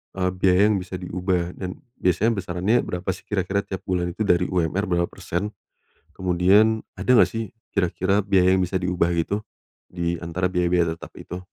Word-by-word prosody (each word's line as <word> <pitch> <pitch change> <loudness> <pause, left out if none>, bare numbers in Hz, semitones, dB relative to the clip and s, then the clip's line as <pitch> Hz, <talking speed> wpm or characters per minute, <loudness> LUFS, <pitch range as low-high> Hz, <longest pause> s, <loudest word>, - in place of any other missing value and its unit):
eee, 90 -1 0
biaya 95 +2 +4
yang 100 - +1
bisa 90 0 -7
diubah? 90 -1 -2
Dan 90 +7 -6 0.2
biasanya 95 +6 +2
besarannya 95 +5 +1
berapa 90 +1 -4
sih 90 - -10
kira-kira 95 -1 0
tiap 95 -2 -6
bulan 90 -1 -1
itu 110 - -1
dari 90 -4 +2
UMR 90 +2 0
berapa 85 -1 +1
persen? 100 +5 -3 0.6
Kemudian 95 +5 +3
ada - - -7
gak - - +7
sih 115 -2 -3 0.2
kira-kira 95 +1 +1
biaya 95 -2 +3
yang 95 - +3
bisa 90 +1 0
diubah 90 -1 0
gitu, 100 +6 -1 0.5
di 85 -1 -2
antara 90 +2 -2
biaya-biaya 85 -2 +2
tetap - - -11
itu? 90 - -7
90 Hz, 170 wpm, -24 LUFS, 90-95 Hz, 0.6 s, gak